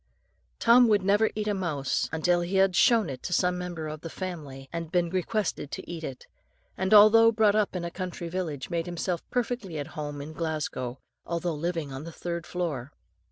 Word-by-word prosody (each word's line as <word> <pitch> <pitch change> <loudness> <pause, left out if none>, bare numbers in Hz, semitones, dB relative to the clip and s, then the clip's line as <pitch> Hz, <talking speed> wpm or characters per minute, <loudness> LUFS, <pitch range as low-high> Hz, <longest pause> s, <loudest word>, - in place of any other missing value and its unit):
"Tom 240 +1 +6
would 205 -3 +3
never 205 +3 +3
eat 215 0 -2
a 210 - +2
mouse 155 -8 -1
until 175 +2 +2
he 175 +3 -3
had 190 -1 +4
shown 230 -2 +5
it 130 -3 -6
to - - -5
some 180 0 +2
member 175 -3 -4
of 155 0 -6
the 165 - -6
family, 150 -8 -6
and 165 -1 -4
been 175 -2 +1
requested 185 -4 -1
to - - -7
eat 170 -2 -6
it; 135 -4 -6 0.5
and 190 0 -2
although 215 +2 +8
brought 215 -2 +4
up 210 -2 +1
in 175 -1 -2
a 170 - -4
country 180 -1 -5
village, 165 -6 -4
made 170 0 -1
himself 175 0 -2
perfectly 240 -8 -2
at 145 0 -4
home 145 -1 -5
in 150 +2 -7
Glasgow, 155 -6 -3 0.3
although 170 0 -2
living 160 -2 -3
on 135 +2 -6
the 170 - -7
third 170 0 -5
floor. 150 -7 -3
175 Hz, 200 wpm, -27 LUFS, 155-195 Hz, 0.5 s, although